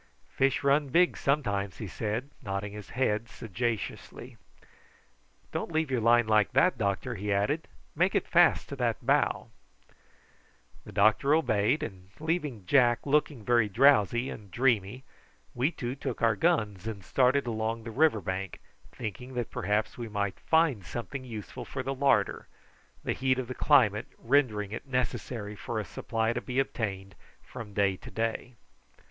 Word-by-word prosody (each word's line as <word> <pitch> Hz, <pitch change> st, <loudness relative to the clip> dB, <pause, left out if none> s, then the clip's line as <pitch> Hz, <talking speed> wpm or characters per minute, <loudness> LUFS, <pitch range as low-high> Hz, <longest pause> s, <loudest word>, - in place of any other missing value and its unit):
"Fish 135 Hz, +1 st, +1 dB
run 140 Hz, +1 st, +3 dB
big, 175 Hz, +6 st, +4 dB
sometimes," 100 Hz, -9 st, -1 dB
he 110 Hz, -, -5 dB
said, 110 Hz, +7 st, -3 dB
nodding 100 Hz, +1 st, -4 dB
his 105 Hz, -2 st, -9 dB
head 115 Hz, -3 st, 0 dB
sagaciously. 115 Hz, 0 st, -4 dB, 1.2 s
"Don't -, -, -3 dB
leave 160 Hz, -3 st, 0 dB
your 125 Hz, -3 st, +1 dB
line 120 Hz, +1 st, +5 dB
like 110 Hz, -1 st, +2 dB
that, 135 Hz, +7 st, +4 dB
doctor," 100 Hz, -4 st, -1 dB
he 105 Hz, -1 st, -3 dB
added; 105 Hz, +11 st, 0 dB, 0.3 s
"make 180 Hz, +5 st, +2 dB
it -, -, +1 dB
fast 175 Hz, -1 st, +4 dB
to 140 Hz, -, -5 dB
that 120 Hz, -2 st, -1 dB
bough." 140 Hz, -4 st, +1 dB, 1.3 s
The -, -, -10 dB
doctor 110 Hz, +8 st, +4 dB
obeyed, 115 Hz, -3 st, +1 dB
and 95 Hz, -3 st, -8 dB
leaving 150 Hz, -, -2 dB
Jack 120 Hz, +1 st, +3 dB
looking 145 Hz, -5 st, +1 dB
very 120 Hz, -3 st, +3 dB
drowsy 120 Hz, 0 st, +4 dB
and 105 Hz, -2 st, -10 dB
dreamy 120 Hz, 0 st, +1 dB, 0.5 s
we 125 Hz, +4 st, +1 dB
two 125 Hz, -7 st, -4 dB
took 135 Hz, -2 st, -5 dB
our 115 Hz, -2 st, +4 dB
guns 105 Hz, 0 st, 0 dB
and 100 Hz, -4 st, -6 dB
started 130 Hz, +1 st, +2 dB
along 115 Hz, 0 st, -2 dB
the 115 Hz, -, -6 dB
river 140 Hz, -4 st, +3 dB
bank, 95 Hz, +1 st, -4 dB, 0.3 s
thinking 125 Hz, +3 st, -7 dB
that 120 Hz, -2 st, -3 dB
perhaps 105 Hz, +3 st, -1 dB
we 115 Hz, -2 st, -5 dB
might 100 Hz, -2 st, -2 dB
find 160 Hz, -, +2 dB
something 120 Hz, +7 st, -6 dB
useful 110 Hz, -5 st, -7 dB
for 130 Hz, -, -5 dB
the 135 Hz, +1 st, -2 dB
larder, 130 Hz, -7 st, +1 dB, 0.6 s
the -, -, -1 dB
heat 130 Hz, 0 st, +1 dB
of 130 Hz, -2 st, -3 dB
the 130 Hz, -, -4 dB
climate 120 Hz, -8 st, +3 dB
rendering 115 Hz, -6 st, +1 dB
it 110 Hz, -, -6 dB
necessary 120 Hz, -4 st, -3 dB
for 110 Hz, +2 st, -4 dB
a 105 Hz, -, -4 dB
supply 115 Hz, +3 st, -2 dB
to 120 Hz, -, -3 dB
be 125 Hz, -, -5 dB
obtained 95 Hz, -7 st, -2 dB, 0.3 s
from 105 Hz, -3 st, -9 dB
day 100 Hz, -2 st, +2 dB
to -, -, -11 dB
day. 115 Hz, +2 st, -3 dB
115 Hz, 155 wpm, -29 LUFS, 105-135 Hz, 1.3 s, line